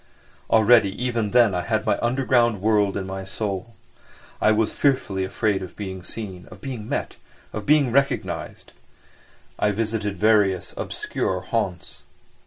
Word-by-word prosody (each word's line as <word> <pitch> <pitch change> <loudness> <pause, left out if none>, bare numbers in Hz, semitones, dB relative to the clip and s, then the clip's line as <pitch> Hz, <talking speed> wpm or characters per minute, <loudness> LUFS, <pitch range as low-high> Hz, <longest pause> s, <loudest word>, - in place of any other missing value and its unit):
Already 110 -3 +5
even 120 -4 -1
then 115 -3 +4
I 90 - 0
had 110 +3 -1
my - - +1
underground 120 -3 +2
world 105 -1 +2
in 95 - -3
my 95 0 -5
soul. 100 +2 -4 0.7
I 110 - +5
was 110 0 +1
fearfully 130 -9 +1
afraid 100 +1 0
of 95 - -8
being 95 -2 -6
seen, 95 -2 -7
of - - -12
being 120 -6 -6
met, - - -3 0.4
of 105 -1 -5
being 145 -4 +4
recognised. 140 +2 -1 0.9
I 105 - +3
visited 105 -1 -2
various 105 -4 +2
obscure - - -3
haunts. - - -3
110 Hz, 140 wpm, -23 LUFS, 95-120 Hz, 0.9 s, Already